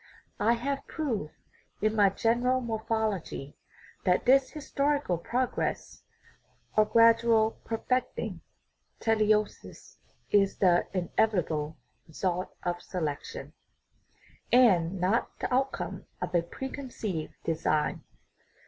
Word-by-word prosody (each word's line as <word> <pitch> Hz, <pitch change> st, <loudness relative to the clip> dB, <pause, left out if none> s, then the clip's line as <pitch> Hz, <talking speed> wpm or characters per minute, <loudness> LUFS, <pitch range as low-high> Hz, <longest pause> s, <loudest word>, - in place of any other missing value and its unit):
I 230 Hz, +2 st, +4 dB
have 275 Hz, +4 st, -3 dB
proved 230 Hz, -, -3 dB, 0.4 s
in 215 Hz, +1 st, +1 dB
my 205 Hz, -2 st, +5 dB
General 240 Hz, +5 st, +1 dB
Morphology 220 Hz, -, -2 dB, 0.5 s
that 180 Hz, -1 st, +2 dB
this 265 Hz, +1 st, +5 dB
historical 285 Hz, -, -1 dB
progress 250 Hz, +8 st, -2 dB, 0.7 s
or 215 Hz, -, +5 dB
gradual 230 Hz, 0 st, +4 dB
perfecting 250 Hz, +3 st, -2 dB, 0.6 s
(teleosis) 215 Hz, -1 st, 0 dB, 0.3 s
is 195 Hz, -1 st, +3 dB
the 175 Hz, -2 st, +3 dB
inevitable 175 Hz, -5 st, 0 dB, 0.3 s
re 160 Hz, -, -17 dB
sult 180 Hz, -1 st, -1 dB
of 175 Hz, 0 st, -2 dB
selection, 155 Hz, -6 st, -5 dB, 1.0 s
and 195 Hz, -8 st, +4 dB
not 190 Hz, +6 st, 0 dB
the -, -, -3 dB
outcome 270 Hz, +1 st, -1 dB
of -, -, -4 dB
a 175 Hz, -, +4 dB
preconceived 220 Hz, -, -5 dB
design. 155 Hz, -2 st, 0 dB
215 Hz, 95 wpm, -29 LUFS, 180-240 Hz, 1.0 s, my